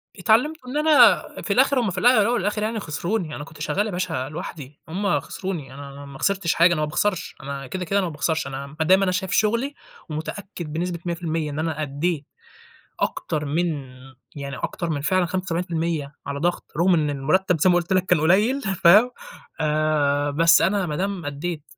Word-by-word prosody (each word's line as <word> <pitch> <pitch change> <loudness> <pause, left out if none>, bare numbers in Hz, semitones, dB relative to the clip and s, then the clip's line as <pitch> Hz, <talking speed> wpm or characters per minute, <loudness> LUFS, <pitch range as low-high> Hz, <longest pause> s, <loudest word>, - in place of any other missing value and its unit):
اتعلمت 225 - +2
إن 260 +4 -3
أنا 305 0 +6 0.2
في - - -1
الآخر 275 - +4
هُم 225 -6 0
في 180 - -7
الا 235 +6 +5
الاول 205 - +2
والآخر 210 -1 -1
يعني 220 +1 -1
خسروني، 170 0 -3
أنا 145 - -6
كنت 155 0 -13
شغال 200 +6 0
يا - - -4
باشا 175 -7 -2
لوحدي، 150 -3 -8
هُم 200 +5 0
خسروني، 170 -9 -6
أنا 140 0 -9
ما 140 -1 -11
خسرتش 195 -2 +1
حاجة، 175 +1 +5
أنا 155 - -1
ما - - +2
باخسرش، 185 +4 -1
أنا 140 -1 -6
كده 185 +5 -4
كده 195 +4 +1
أنا 190 - 0
ما - - -5
باخسرش، 160 0 -1
أنا 135 +1 -6
ما 160 - +1
دام 190 +4 +5
أنا 185 - +1
شايف 185 0 -2
شغلي 235 +6 +1 0.4
ومتأكد 160 +1 -6
بنسبة 170 +1 -2
100% 165 -3 -2
إن 145 - -4
أنا 160 -1 -2
أدّيت 150 +2 -2 0.7
أكتر 150 -1 -2
من 160 +5 0 0.7
يعني 140 -1 -6
أكتر 170 - -3
من 145 -3 -1
فعلًا 185 +5 +2
75% 170 -4 -2
على 140 0 -4
ضغط، 175 +3 -1
رُغم 180 +3 +4
إن 155 -3 +2
المرتب 155 +5 +1
زي 185 - +4
ما 180 - +4
قُلت 175 +2 0
لك 185 0 +2
كان 180 -3 +3
قليّل، 210 - +3
فاهم، 195 +4 +5 0.5
آآ، 150 -2 +1
بس 165 +3 +5
أنا 195 +1 +2
ما 150 -3 -3
دام 190 -1 -3
أدّيت 150 +2 -4
170 Hz, 195 wpm, -23 LUFS, 150-190 Hz, 0.7 s, أنا